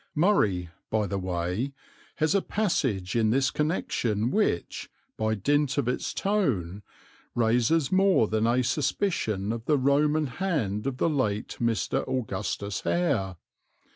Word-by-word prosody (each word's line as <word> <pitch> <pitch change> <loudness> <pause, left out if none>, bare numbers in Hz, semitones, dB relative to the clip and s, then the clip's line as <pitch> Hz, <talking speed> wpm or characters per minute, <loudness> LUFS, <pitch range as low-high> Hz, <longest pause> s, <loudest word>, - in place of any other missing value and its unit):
"Murray," 105 - +2 0.2
by 110 -1 +1
the 100 -1 -2
way, 90 +8 -2 0.4
has 155 +3 +1
a 200 - +3
passage 130 - -1
in 110 -2 +3
this 130 +3 +2
connection 120 - -1
which, 210 - -1 0.3
by 110 0 0
dint 145 +6 +1
of 140 -4 +1
its 125 - -1
tone, 110 - -1 0.5
raises 120 +6 +2
more 190 - +4
than 110 +1 +1
a 125 +2 +2
suspicion 120 - -1
of 115 0 -6
the 150 - +3
Roman 150 +3 +2
hand 130 - -2
of 130 -2 -2
the - - +2
late 125 -9 -1
Mr. 115 -1 0
Augustus 105 -5 -3
Hare. 100 - 0
125 Hz, 135 wpm, -27 LUFS, 105-150 Hz, 0.5 s, more